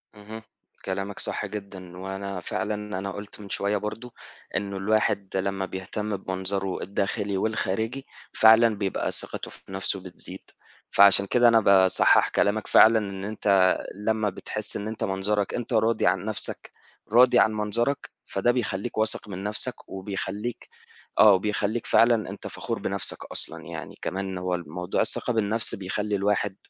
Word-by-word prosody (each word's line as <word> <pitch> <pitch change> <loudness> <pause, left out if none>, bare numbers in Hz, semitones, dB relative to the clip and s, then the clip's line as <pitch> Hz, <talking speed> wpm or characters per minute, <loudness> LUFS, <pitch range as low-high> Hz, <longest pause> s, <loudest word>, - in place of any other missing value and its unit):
اهم، 105 +2 -9 0.4
كلامك 100 +1 -4
صح - - -2
جدًا 95 -3 -8
وأنا 95 0 -5
فعلًا 105 0 -3
أنا 100 +1 -4
قُلت 100 +1 -9
من 100 -1 -10
شوية 100 +1 +1
برضه 110 +4 -6 0.4
إنه 100 -1 -2
الواحد 100 -1 0
لمّا 95 0 -1
بيهتم 100 +3 -4
بمنظره 95 0 -3
الداخلي 100 +1 -2
والخارجي 110 +5 -2 0.3
فعلًا 110 0 +6
بيبقى 100 -2 -2
ثقته - - -2
في - - -13
نفْسه 95 0 -1
بتزيد، 90 +1 -9 0.5
فعشان 100 0 +6
كده 120 +4 +4
أنا 115 -1 +6
باصحّح 95 -3 +5
كلامك 100 +1 +1
فعلًا 115 +1 +7
إن 100 -2 -5
أنت 100 -3 +3 0.2
لمّا 110 +1 0
بتحس 105 +2 -4
إن 105 +1 -5
أنت 110 0 -4
منظرك 100 +1 -1
أنت 120 0 -4
راضي 115 +1 +2
عن - - +1
نفْسك - - -3 0.4
راضي 125 +2 +6
عن 110 - +4
منظرك 115 +6 -1 0.2
فده 100 +5 +1
بيخلّيك 120 -3 -3
واثق 110 0 0
من 95 -1 -6
نفْسك، 105 +4 -1
وبيخلّيك 100 +4 -5 0.5
آه 110 -1 +8
وبيخلّيك 105 +3 0
فعلًا 115 -3 +3
أنت - - -8
فخور - - -4
بنفْسك - - -3
أصلًا - - -1
يعني، - - -8
كمان 95 0 -3
هو 90 0 -2
ال 85 -3 -5
موضوع 90 +3 -2
الثقة - - 0
بالنفْس 110 0 +2
بيخلّي 100 +2 -2
الواحد 100 0 0
100 Hz, 150 wpm, -26 LUFS, 95-110 Hz, 0.5 s, آه